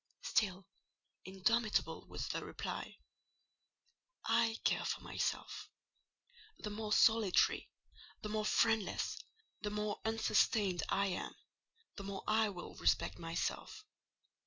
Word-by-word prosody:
Still 195 Hz, -, +1 dB, 0.6 s
indomitable 210 Hz, +4 st, +1 dB
was -, -, -4 dB
the -, -, -2 dB
reply—"I 475 Hz, -, -4 dB
care -, -, +2 dB
for -, -, -1 dB
myself. -, -, -3 dB, 0.9 s
The 210 Hz, -, -5 dB
more 215 Hz, 0 st, -4 dB
solitary, 220 Hz, -3 st, +4 dB, 0.5 s
the 210 Hz, -, -3 dB
more 215 Hz, 0 st, 0 dB
friendless, 220 Hz, -2 st, +2 dB, 0.5 s
the 210 Hz, -, -1 dB
more 210 Hz, 0 st, -2 dB
unsustained 220 Hz, -4 st, +2 dB
I 200 Hz, -, +2 dB
am, 180 Hz, -, -4 dB, 0.6 s
the 200 Hz, -, -5 dB
more 195 Hz, 0 st, -5 dB
I 220 Hz, 0 st, +3 dB
will 180 Hz, -3 st, -7 dB
respect -, -, +1 dB
myself. 170 Hz, -, -3 dB
210 Hz, 105 wpm, -36 LUFS, 195-225 Hz, 0.9 s, solitary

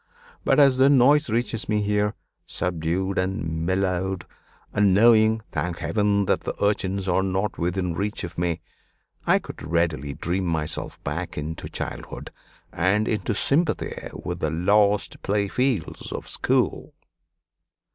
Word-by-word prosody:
But -, -, +3 dB
as 135 Hz, -3 st, +5 dB
their 135 Hz, +1 st, +6 dB
noise 145 Hz, +2 st, +5 dB
reaches 115 Hz, 0 st, -1 dB
me 105 Hz, -1 st, +1 dB
here, 105 Hz, +1 st, +1 dB, 0.3 s
subdued 90 Hz, +3 st, -1 dB
and 85 Hz, -4 st, -2 dB
mellowed; 95 Hz, 0 st, 0 dB, 0.5 s
and 100 Hz, -2 st, +4 dB
knowing, 110 Hz, 0 st, +5 dB
thank 90 Hz, -1 st, -2 dB
Heaven! 100 Hz, +4 st, +1 dB
that -, -, +1 dB
the -, -, -4 dB
urchins 100 Hz, -1 st, 0 dB
are 90 Hz, +1 st, +2 dB
not 95 Hz, +1 st, -1 dB
within 90 Hz, +1 st, -1 dB
reach 100 Hz, +5 st, -2 dB
of 85 Hz, -, -6 dB
me, 85 Hz, -1 st, -1 dB, 0.7 s
I -, -, +5 dB
could -, -, -8 dB
readily 75 Hz, -3 st, -1 dB
dream 90 Hz, +3 st, -2 dB
myself 80 Hz, -2 st, -2 dB
back -, -, -4 dB
into 80 Hz, +2 st, -5 dB
childhood -, -, -6 dB, 0.4 s
and 100 Hz, +5 st, +2 dB
into 110 Hz, 0 st, -1 dB
sympathy 150 Hz, -, +1 dB, 0.2 s
with 90 Hz, +1 st, -5 dB
the 80 Hz, -, 0 dB
lost 100 Hz, +5 st, +2 dB
playfields 105 Hz, -, -1 dB
of -, -, -5 dB
school. -, -, 0 dB
95 Hz, 135 wpm, -24 LUFS, 85-105 Hz, 0.7 s, their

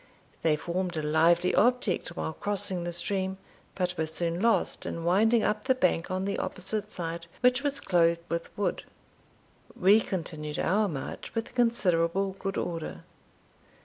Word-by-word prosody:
They 160 Hz, -2 st, +3 dB
formed 175 Hz, +2 st, -3 dB
a 155 Hz, -, -2 dB
lively 165 Hz, +4 st, +3 dB
object 245 Hz, -4 st, +2 dB
while 160 Hz, -, -3 dB
crossing 190 Hz, -2 st, 0 dB
the 175 Hz, -, -2 dB
stream, 190 Hz, +2 st, -1 dB, 0.4 s
but 180 Hz, -1 st, -1 dB
were 160 Hz, -, 0 dB
soon 170 Hz, +2 st, -1 dB
lost 230 Hz, 0 st, +2 dB
in 165 Hz, -, -4 dB
winding 215 Hz, +7 st, +3 dB
up 210 Hz, +2 st, 0 dB
the 260 Hz, -1 st, +3 dB
bank 180 Hz, -7 st, +1 dB
on 185 Hz, +1 st, -2 dB
the 200 Hz, -, -2 dB
opposite 200 Hz, +3 st, -2 dB
side, 170 Hz, -1 st, -5 dB
which 250 Hz, +1 st, +4 dB
was 285 Hz, -1 st, 0 dB
clothed 170 Hz, -2 st, +2 dB
with 170 Hz, -1 st, -3 dB
wood. 205 Hz, -, -1 dB, 0.9 s
We 200 Hz, +4 st, +5 dB
continued 155 Hz, -6 st, -3 dB
our 210 Hz, +4 st, +2 dB
march 140 Hz, -, -6 dB
with 225 Hz, 0 st, -3 dB
considerable 195 Hz, -6 st, +2 dB
good 195 Hz, -1 st, -3 dB
order. 165 Hz, -2 st, -4 dB
180 Hz, 150 wpm, -28 LUFS, 170-205 Hz, 0.9 s, We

